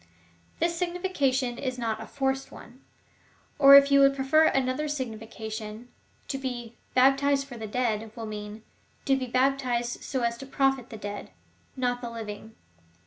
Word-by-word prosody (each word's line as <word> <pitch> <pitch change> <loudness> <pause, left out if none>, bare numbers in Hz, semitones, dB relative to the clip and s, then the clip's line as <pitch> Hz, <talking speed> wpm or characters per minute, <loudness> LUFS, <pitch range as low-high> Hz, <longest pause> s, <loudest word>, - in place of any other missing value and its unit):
This 335 +1 0
signification 310 -9 -1
is 255 -1 -3
not 225 -3 -2
a - - -8
forced 270 -1 -2
one. 245 +4 -13 0.8
Or 275 -1 +10
if 280 0 +7
you 280 - +6
would 275 0 +5
prefer 275 +4 +4
another 265 +1 +1
significa 225 -6 -5
tion, 220 +2 -7 0.4
to 270 - -3
be 240 -3 -5 0.2
baptized 275 +2 +4
for 270 -3 -10
the 220 -2 -6
dead 225 -1 -1
will 230 -2 -6
mean 210 0 -7 0.2
— - - -36
to 275 - +3
be 260 -1 -3
baptized 255 -2 0
so 260 -2 -3
as 235 0 -1
to 270 - -8
profit 270 -2 +1
the 220 - -8
dead 205 0 -6 0.3
— - - -36
not 245 0 0
the 240 - -5
living. 220 -1 -8
255 Hz, 170 wpm, -27 LUFS, 225-275 Hz, 0.8 s, Or